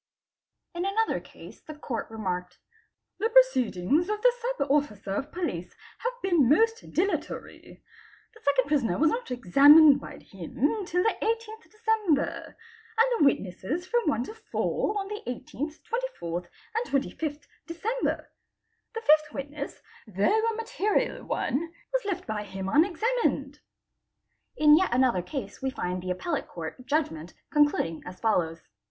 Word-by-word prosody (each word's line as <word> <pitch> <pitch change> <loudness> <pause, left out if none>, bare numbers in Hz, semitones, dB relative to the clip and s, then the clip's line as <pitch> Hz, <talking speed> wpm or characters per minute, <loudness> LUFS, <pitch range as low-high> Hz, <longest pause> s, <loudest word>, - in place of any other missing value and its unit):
In 345 +1 -3
another 425 +3 +1
case - - -14
the 310 - -10
Court 255 -6 -4
remarked 180 -5 -4 0.3
:—' - - -57
The 450 - +1
proceedings 320 - +3
of 425 0 -1
the - - +6
Sub 475 - -1
Officer 210 -9 0
of 275 +8 -3
Police 180 - -4 0.2
have 485 +1 -2
been 340 -10 +3
most 450 +9 +2
dilatory. 390 +5 -3 0.5
The 445 - -17 0.2
2nd - - -14
prisoner 275 -10 +1
was 315 0 +4
not - - -3
examined 280 - +7
by - - -9
him 275 - -2
till 360 +1 +1
the 445 - +2
18th 450 0 -3
December, 430 -9 0 0.4
and 470 +1 +3
the - - +5
witnesses 255 - 0
from 475 0 0
1 240 -5 0
to 345 - -8
4 435 -1 -2
on 390 - -4
the 420 +1 -5
18th, 275 +5 -5 0.4
24th, 170 +1 -4 0.3
and 455 +2 -1
25th, 290 +2 -2 0.2
December. 425 +9 -2 0.6
The 455 - -3
5th 305 -5 +4
witness 285 +1 -6 0.2
though 405 - +2
a. 455 - -2
material 440 -2 -1
one, 330 +5 -2 0.2
was - - 0
left 370 -2 -3
by 215 -1 -3
him 195 -1 -6
unexamuined.'' 390 - +1 1.0
3 - - -4
In 300 0 +9
yet 375 - +1
another 245 -6 +3
case 270 - -6
we 265 - 0
find 180 -7 -3
the 185 - -6
Appellate 285 - -2
Court 170 +9 -8
judgment 175 - -1 0.2
conclud 295 -1 +4
ing 165 -1 -7
as 180 0 -9
follows. 165 -7 0
300 Hz, 150 wpm, -27 LUFS, -, 1.0 s, In